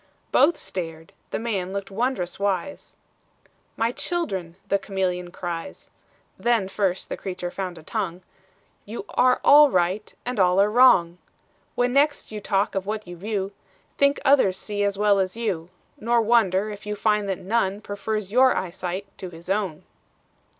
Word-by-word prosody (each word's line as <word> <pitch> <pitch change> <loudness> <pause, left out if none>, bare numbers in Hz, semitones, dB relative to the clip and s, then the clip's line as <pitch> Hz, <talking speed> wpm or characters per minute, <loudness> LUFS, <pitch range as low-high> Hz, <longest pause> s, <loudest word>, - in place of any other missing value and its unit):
Both 320 +5 +4
stared, 165 -3 -6 0.2
the - - -2
man 195 -5 -2
looked 200 0 -4
wondrous 210 -5 -2
wise 200 +8 -2 0.8
"My 230 +1 +1
children," 195 - -3
the 200 0 +2
chameleon 185 -3 -2
cries, 175 -2 -6 0.5
(Then 235 -5 +2
first 195 -2 -1
the - - -4
creature 180 -2 -5
found 185 -2 -5
a 160 - -12
tongue,) 185 -2 -3 0.6
"You 220 +3 -7
are 250 0 +3
all 295 +1 +8
right, 185 +1 0
and 250 -3 -3
all 180 0 +4
are 205 +1 +4
wrong: 200 -8 +5 0.6
When 245 0 +1
next 285 -1 +2
you 215 - -5
talk 200 +2 0
of 195 0 -3
what 215 -1 -3
you 175 - -8
view, 195 +1 -3 0.4
Think 280 0 +3
others 260 -10 +4
see 205 +1 -2
as 200 -1 0
well 205 -1 +3
as 190 +3 -1
you; 185 -8 -2 0.3
Nor 235 +2 +2
wonder, 215 -3 +2
if 205 0 -9
you 210 - -2
find 210 -1 +1
that 190 - -1
none 200 -1 0
Prefers 205 -1 -4
your 255 +3 +5
eyesight 185 +1 -3
to 185 - -6
his 170 +2 -8
own." 195 -6 -1
200 Hz, 160 wpm, -24 LUFS, 185-225 Hz, 0.8 s, all